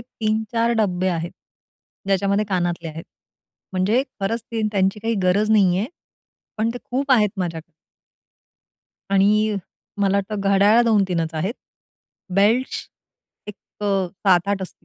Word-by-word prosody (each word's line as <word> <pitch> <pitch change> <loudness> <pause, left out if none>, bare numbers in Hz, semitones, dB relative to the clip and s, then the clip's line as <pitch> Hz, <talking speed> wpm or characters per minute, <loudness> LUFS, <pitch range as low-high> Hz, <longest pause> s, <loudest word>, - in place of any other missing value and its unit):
3-4 230 0 -1
डब्बे 185 -3 +1
आहेत, 170 -1 -2 0.8
ज्याच्यामध्ये 200 +1 +1
कानातले 175 -3 -1
आहेत. 160 +1 -8 0.7
म्हणजे 195 +7 +2 0.2
खरंच 220 +4 -1
ते 220 -2 -1
त्यांची 195 +1 +1
काही 225 +1 -1
गरज 200 +4 +2
नाहीये, 195 -1 +3 0.7
पण 220 +2 0
ते 245 - -5
खूप 270 +3 -3
आहेत 210 -4 +4
माझ्याक 170 -4 -3 1.5
आणि 210 +2 +3 0.5
मला 200 0 +2
वाटतं, 200 +1 -2
घड्याळ 205 +4 +5
2-3 195 -7 +2
च 160 - -17
आहेत, 190 +9 -2 0.8
बेल्ट्स 225 +6 +1 0.6
एक 210 - -6 0.3
अ, 195 -2 +1
7-8 190 +1 +1
असती 185 - -10
200 Hz, 120 wpm, -22 LUFS, 185-220 Hz, 1.5 s, घड्याळ